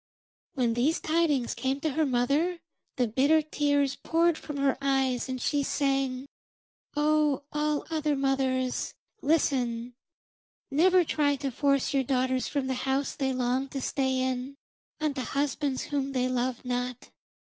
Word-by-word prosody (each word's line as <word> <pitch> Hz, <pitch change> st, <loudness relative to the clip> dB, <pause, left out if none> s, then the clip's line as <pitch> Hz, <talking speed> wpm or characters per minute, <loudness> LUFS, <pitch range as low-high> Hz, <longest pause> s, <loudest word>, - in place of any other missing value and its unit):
When 245 Hz, -4 st, +1 dB
these 260 Hz, +8 st, +1 dB
tidings 310 Hz, -6 st, +1 dB
came 270 Hz, +1 st, -1 dB
to 315 Hz, -, 0 dB
her 310 Hz, +2 st, +1 dB
mother 280 Hz, +8 st, +1 dB, 0.4 s
the 250 Hz, -2 st, +1 dB
bitter 280 Hz, +8 st, +3 dB
tears 285 Hz, -2 st, +1 dB
poured 335 Hz, 0 st, +2 dB
from 295 Hz, -2 st, -7 dB
her 275 Hz, -1 st, +2 dB
eyes, 265 Hz, -2 st, +1 dB
and 255 Hz, 0 st, -3 dB
she 285 Hz, +3 st, +1 dB
sang, 270 Hz, -2 st, 0 dB, 0.7 s
'O 300 Hz, -2 st, +2 dB
all 300 Hz, 0 st, 0 dB
other 305 Hz, -2 st, +1 dB
mothers, 265 Hz, -2 st, 0 dB, 0.3 s
listen: 250 Hz, -6 st, +1 dB, 0.8 s
never 360 Hz, +5 st, +5 dB
try 290 Hz, -3 st, +1 dB
to 275 Hz, -1 st, -3 dB
force 275 Hz, +2 st, +1 dB
your 275 Hz, -, +3 dB
daughters 260 Hz, 0 st, 0 dB
from 280 Hz, -2 st, -1 dB
the 260 Hz, -, -1 dB, 0.2 s
house 270 Hz, +1 st, 0 dB
they 270 Hz, -2 st, -1 dB
long 255 Hz, +1 st, 0 dB
to 275 Hz, -, -5 dB
stay 265 Hz, 0 st, 0 dB
in, 260 Hz, +1 st, -2 dB, 0.4 s
unto 295 Hz, -4 st, -1 dB
husbands 275 Hz, +1 st, -1 dB
whom 275 Hz, -1 st, -2 dB
they 255 Hz, -1 st, +1 dB
love 255 Hz, 0 st, -2 dB
not. 250 Hz, 0 st, -3 dB
275 Hz, 145 wpm, -28 LUFS, 255-295 Hz, 0.8 s, never